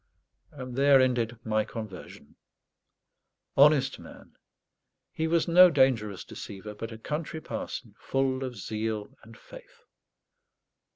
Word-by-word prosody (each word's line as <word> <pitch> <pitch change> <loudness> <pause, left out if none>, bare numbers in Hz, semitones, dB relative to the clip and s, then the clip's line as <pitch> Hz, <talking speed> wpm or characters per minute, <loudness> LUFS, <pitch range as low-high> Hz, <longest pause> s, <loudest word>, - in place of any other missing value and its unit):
And 130 -4 -8
there 140 0 +5
ended 120 -2 +1
my 110 -1 +1
conversion. 110 -4 -9 1.2
Honest 140 -1 +4
man! - - -14 0.8
he 160 - -2
was 165 0 +1
no 180 +2 +8
dangerous 120 - +1
deceiver; 105 +2 -9
but 115 +2 -7
a 110 - -8
country 150 +6 -4
parson, - - -6
full 135 0 -1
of 130 -2 -5
zeal 110 +4 -4
and 115 +1 -15
faith. - - -15
130 Hz, 115 wpm, -28 LUFS, 110-150 Hz, 1.2 s, no